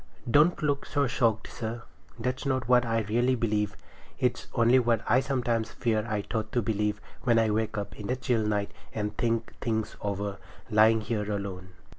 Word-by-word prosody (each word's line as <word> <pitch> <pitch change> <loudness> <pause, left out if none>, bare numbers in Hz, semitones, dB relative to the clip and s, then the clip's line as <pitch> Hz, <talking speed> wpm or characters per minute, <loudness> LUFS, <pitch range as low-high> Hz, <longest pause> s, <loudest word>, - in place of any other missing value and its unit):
Don't 150 +7 +4
look 145 -2 0
so 145 -1 +1
shocked, 115 -4 +1
sir. 115 0 -5 0.3
That's 125 +2 -2
not 130 -4 0
what 125 -1 +4
I 115 0 +1
really 120 +5 +1
believe; 105 -3 0 0.4
it's 125 -2 0
only 120 +1 +5
what 120 -2 +2
I - - +5
sometimes 120 -5 0
fear 110 -2 0
I 105 -1 -1
ought 110 -1 -2
to 120 - +2
believe, 105 0 0 0.2
when 120 -2 +3
I 110 -1 +3
wake 110 +1 -1
up 100 - -4
in 105 - -5
the 125 - 0
chill 125 -3 0
night 105 -1 0 0.2
and 105 -1 -2
think 115 0 -1
things 110 -3 -1
over, 100 0 -3 0.3
lying 110 +1 +5
here 105 -1 -2
alone. 95 -2 -5
115 Hz, 180 wpm, -28 LUFS, 105-125 Hz, 0.4 s, only